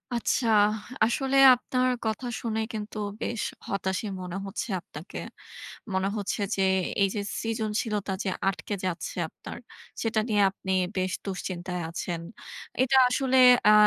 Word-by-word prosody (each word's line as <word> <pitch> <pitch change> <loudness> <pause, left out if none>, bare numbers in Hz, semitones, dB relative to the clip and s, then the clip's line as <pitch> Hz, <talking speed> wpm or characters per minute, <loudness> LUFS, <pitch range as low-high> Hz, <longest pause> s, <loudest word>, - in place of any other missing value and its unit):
আচ্ছা। 235 +1 +1 0.6
আসলে 270 +3 +1 0.2
আপনার 255 +1 0 0.2
কথা 220 +3 -2 0.2
শুনে 220 -2 -1
কিন্তু 215 0 -5 0.2
বেশ 235 - -2 0.3
হতাশই 190 +2 -2
মনে 180 +1 -5
হচ্ছে 195 +4 -4
আপনাকে। 160 +3 -9 0.7
মনে 190 +1 +1
হচ্ছে 205 0 -2 0.2
যে, 195 - +1 0.4
এইযে 200 +1 +1 0.2
সৃজনশীলতা 215 -2 -1
যে 190 - 0 0.2
আটকে 195 +2 -3
যাচ্ছে 180 0 -3
আপনার, - - -9 0.4
সেটা 225 -1 +1
নিয়ে 205 -2 +3
আপনি 190 -1 -4 0.2
বেশ 185 0 0
দুশ্চিন্তায় 180 -2 -4
আছেন। 170 0 -4 0.6
এটা 265 +1 +3
আসলে 260 +1 +1 0.3
অ্যা 210 - +8
210 Hz, 125 wpm, -27 LUFS, 190-230 Hz, 0.7 s, অ্যা